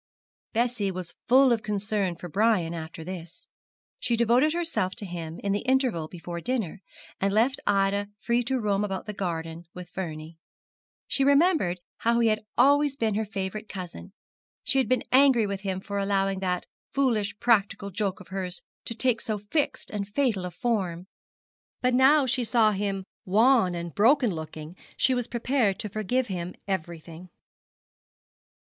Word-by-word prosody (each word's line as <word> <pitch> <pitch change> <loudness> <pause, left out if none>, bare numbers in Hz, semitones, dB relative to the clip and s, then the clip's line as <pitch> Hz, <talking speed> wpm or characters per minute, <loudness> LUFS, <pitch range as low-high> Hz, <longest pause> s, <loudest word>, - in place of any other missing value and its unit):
Bessie 235 -3 +1
was 185 -2 -5
full 260 +1 +6
of 230 -2 +2
concern 205 -3 -1
for 175 - -8
Brian 195 -2 +2
after 160 0 -7
this. 175 -1 -8 0.5
She 240 -2 +1
devoted 240 +6 +3
herself 325 - -1
to 205 - -4
him 170 -3 -6
in 200 - 0
the 205 - +1
interval 255 - +1
before 170 0 -7
dinner, 220 -6 -2 0.4
and 195 +1 +1
left 235 +6 +2
Ida 200 0 +2
free 235 +2 +1
to 260 +1 0
roam 205 -2 +1
about 195 -2 -3
the 210 - -5
garden 170 -3 -4
with 180 -1 -9
Vernie. 160 -3 -6 0.7
She 275 - +1
remembered 280 - +3 0.2
how 235 +1 +2
he 230 -1 +4
had 215 0 0
always 285 +2 +4
been 225 -5 0
her 215 +1 -1
favourite 195 +1 -4
cousin. 185 -1 -7 0.5
She 270 - +2
had 260 - +1
been 255 - +2
angry 260 -4 +5
with 200 -1 -3
him 190 -2 -2
for 200 +1 -4
allowing 195 -1 +1
that 180 -2 -1 0.3
foolish 230 -7 +1
practical 200 -3 +2
joke 195 0 -2
of 185 - -14
hers 185 -2 -4 0.2
to 230 - -5
take 235 -1 +1
so 215 -2 -2
fixed 230 +9 -2
and 200 -2 -3
fatal 210 -4 0
a - - -3
form; 185 -6 -2 0.7
but 250 0 +1
now 270 +3 +5
she 255 0 0
saw 225 -1 +3
him 195 -1 -2 0.2
wan 215 -1 +4
and 170 -1 -5
broken 240 - +4
looking 160 0 -7 0.2
she 260 - +3
was 245 -2 -1
prepared 235 -4 +1
to 210 - -5
forgive 215 +5 0
him 180 -4 -5
everything. 170 -1 -5
205 Hz, 165 wpm, -27 LUFS, 185-240 Hz, 0.7 s, full